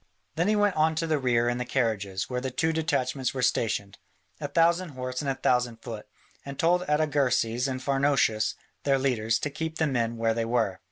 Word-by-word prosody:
Then 170 +3 +1
he 215 - +3
went 205 -2 +2
on 160 +1 +2
to 165 - -1
the 155 -2 +1
rear 120 -2 +2
and 120 0 0
the - - 0
carriages, 110 -7 -1
where 125 -1 -3
the 130 - -2
two 160 +5 0
detachments 135 -5 -1
were 130 - -1
stationed, 105 -5 0 0.4
a 145 - -3
thousand 170 +4 +2
horse 130 +1 -3
and 140 - -2
a 135 - 0
thousand 125 -3 +1
foot, 110 -4 -7 0.4
and 140 -1 -7
told 175 +2 +3
Artagersas 135 -5 +1
and 130 -1 -3
Pharnouchus, 135 -6 +2 0.3
their 140 -1 +3
leaders, 115 -4 +1
to 150 - -3
keep 160 +2 -4
the 160 - +2
men 115 -5 -1
where 115 0 +1
they 115 0 -1
were. 115 -5 0
130 Hz, 205 wpm, -27 LUFS, 115-155 Hz, 0.4 s, he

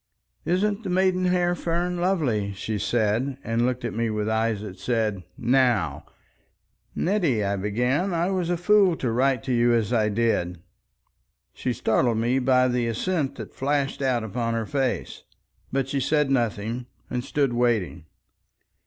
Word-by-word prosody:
"Isn't 200 +4 +1
the 190 - -4
maidenhair 180 -1 +2
fern 175 +1 -1
lovely?" 140 - 0
she 105 +2 -4
said, 115 +5 0
and 115 +2 +1
looked 125 -1 -2
at 120 - -3
me 115 +1 -1
with 105 -1 -2
eyes 110 -1 0
that 100 -3 -8
said, 110 -5 -1 0.2
"Now." 115 - +1 0.9
"Nettie," 170 - +1
I 100 +1 0
began, 125 - 0
"I 170 +2 0
was 180 -3 -1
a 175 - +1
fool 195 0 +4
to 125 -6 -2
write 130 +1 +1
to 130 - -1
you 120 0 +3
as 115 +1 0
I 110 -2 +2
did." 100 -6 0 0.9
She 125 - -2
startled 115 +1 +1
me 120 +4 +1
by 130 0 +3
the 120 -1 0
assent 140 +5 -1
that - - -8
flashed 140 0 -1
out 130 -4 +1
upon 115 +2 -2
her 115 -1 -1
face. 135 0 -2 0.5
But 135 0 0
she 135 0 -1
said 150 +1 +1
nothing, 120 -1 -1 0.2
and 125 -1 -2
stood 140 -2 0
waiting. 110 - 0
125 Hz, 155 wpm, -25 LUFS, 110-150 Hz, 0.9 s, fool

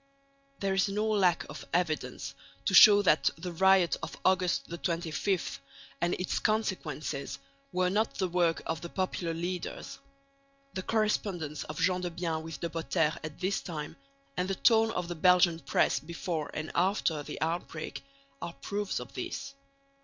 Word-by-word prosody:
There 195 -1 0
is 195 +1 +2
no 210 +2 0
lack 195 -5 +3
of - - -8
evidence 170 -3 -1 0.3
to - - +1
show 205 -2 +9
that 160 -5 +4
the 180 +2 -5
riot 190 0 +4
of - - -6
August 185 -1 +2 0.2
25 170 +2 -1 0.4
and 175 +1 +2
its 180 - -1
consequences 155 -10 -1 0.3
were 180 0 +1
not 215 +3 +1
the 190 - 0
work 175 -2 +1
of 160 -1 -2
the 170 - -6
popular 180 -3 -2
leaders. 175 +2 -4 0.7
The 185 - -3
correspondence 190 -8 -1
of 155 - -7
Gendebien 175 -2 0
with 160 -2 -7
De 170 - -1
Potter 165 -1 +1
at 155 -1 -7
this 190 +2 0
time, 155 -5 -6 0.4
and 180 +1 -1
the 195 - 0
tone 225 +2 +4
of 180 -6 -2
the 175 - -3
Belgian 175 0 +4
press 140 -1 +2
before 165 +1 -4
and 155 +1 -4
after 175 -4 +1
the - - -7
outbreak, 160 -1 -3 0.4
are 170 - -5
proofs 205 +2 -3
of - - -9
this. 275 0 -5
175 Hz, 155 wpm, -30 LUFS, 165-190 Hz, 0.7 s, show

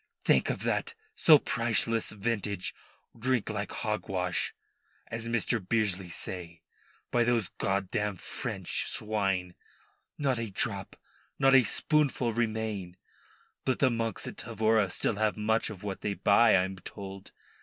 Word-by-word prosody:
"Think - - +4
of - - -2
that 460 0 -1 0.2
so 155 -2 +7
priceless 115 -3 0
vintage 105 -2 -2 0.4
drink 120 -1 0
like 105 -1 -3
hogwash, 95 -5 -2 0.5
as 115 0 -5
Mr. 115 0 +1
Bearsley 95 -3 0
say, 85 -1 -6 0.5
by 120 - +4
those 115 -4 +1
god 95 -1 0
dammed 105 -3 -1
French - - -4
swine, 95 -4 0 0.6
not 135 -4 +1
a 115 -2 -3
drop 100 0 -3 0.4
not 135 0 +5
a 135 -1 +8
spoonful 135 - +1
remain. 110 -5 -2 0.7
But 130 - +1
the 130 -3 +3
monks 115 -1 -2
at - - -7
Tavora 110 -2 +2
still 100 +3 -1
have 110 0 +1
much 110 +1 +1
of 105 -4 -9
what 100 -2 -4
they 100 -1 -1
buy, 105 +4 +5
I 90 - +4
am 95 0 -4
told. 95 +1 -9
110 Hz, 140 wpm, -30 LUFS, 95-115 Hz, 0.7 s, a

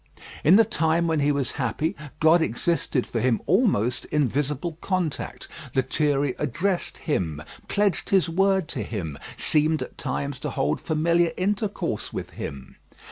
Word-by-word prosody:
In 165 +6 +7
the 225 +2 +7
time 165 -4 +1
when 160 -2 +1
he 145 0 +3
was 140 -2 -1
happy, 150 +6 -1 0.2
God 160 +2 +5
existed 155 -1 0
for 115 - -3
him 125 -1 +2
almost 140 - +2
in 150 -3 +1
visible 150 +5 -2
contact. 185 -6 -2 0.3
Lethierry 140 +1 +1
addressed 175 +7 -1
Him, 85 - -2 0.3
pledged 205 -3 +1
his 190 -3 +4
word 190 0 +2
to - - -3
Him, 80 -10 -5 0.2
seemed 155 +1 +2
at - - -11
times 140 0 -3
to - - -3
hold 75 +2 -1
familiar 170 +2 +2
intercourse 205 +2 -1
with - - -5
Him. 70 -2 -8
155 Hz, 145 wpm, -25 LUFS, 130-175 Hz, 0.3 s, In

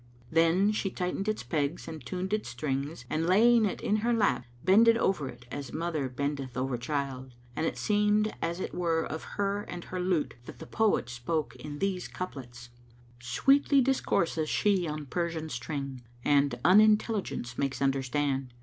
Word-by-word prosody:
Then 165 +5 +4
she 210 -2 -1
tightened 185 +2 -3
its 215 0 -1
pegs 150 +1 -2
and 160 -2 -7
tuned 185 +2 -4
its 215 - -1
strings 135 +2 -3
and 160 +4 -1
laying 225 +4 +5
it 200 - -3
in 210 - +1
her 230 +3 0
lap, 125 - +1 0.2
bended 230 +4 +6
over 180 - 0
it 120 0 -12
as 140 -3 -5
mother 160 -4 -2
bendeth 135 -1 -3
over 130 0 -1
child; 130 0 -4 0.2
and 160 - 0
it - - -3
seemed 210 0 +2
as 170 +2 -2
it - - -4
were 165 -2 0
of 160 - -5
her 200 0 0
and 175 -3 -7
her 185 - -5
lute 180 -4 0
that - - -9
the - - -9
poet 220 - +1
spoke 125 +6 -3
in 145 -1 -7
these 190 +1 -1
couplets, 125 -8 -8 0.5
"Sweetly 275 - +3
discourses 170 - +1
she 195 -5 +2
on 150 -1 -4
Persian 165 +1 -3
string 135 0 -5
* 120 0 -25
And 140 -2 +3
Unintelligence 210 - +3
makes 135 -1 -1
understand. 135 -1 0
160 Hz, 170 wpm, -29 LUFS, 135-195 Hz, 0.5 s, bended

